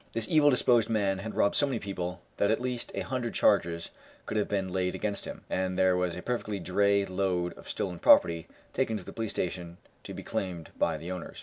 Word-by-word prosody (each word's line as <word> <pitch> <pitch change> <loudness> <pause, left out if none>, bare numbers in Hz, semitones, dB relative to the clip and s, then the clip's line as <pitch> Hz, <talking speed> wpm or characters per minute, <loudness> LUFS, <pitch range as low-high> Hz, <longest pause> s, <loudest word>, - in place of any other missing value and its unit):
This 115 -1 -1
evil 150 -2 +5
disposed 120 -4 +3
man 100 -4 +1
had 110 +2 -6
robbed 100 - +3
so 145 - +4
many 130 -4 -1
people 90 -4 -4 0.2
that 100 - +2
at 110 - +2
least 125 -1 -3
a - - -1
hundred 125 -3 -3
charges 85 0 +2 0.3
could - - -4
have 105 - +1
been 95 -3 -2
laid 90 -1 0
against 105 -1 -2
him, - - -8
and 95 0 -1
there 95 -1 +4
was 90 -1 0
a 90 - -7
perfect 105 -6 -2
dray 100 +1 +3
load 90 -2 -1
of - - -13
stolen 90 -3 -3
property 85 0 +5 0.3
taken 120 -4 0
to - - -8
the - - -9
police 110 -1 -3
station 85 -2 -3 0.3
to - - -7
be - - -7
claimed 90 -4 -4
by 80 -2 +1
the 85 +4 -6
owners. 90 - -6
95 Hz, 220 wpm, -29 LUFS, 90-110 Hz, 0.3 s, evil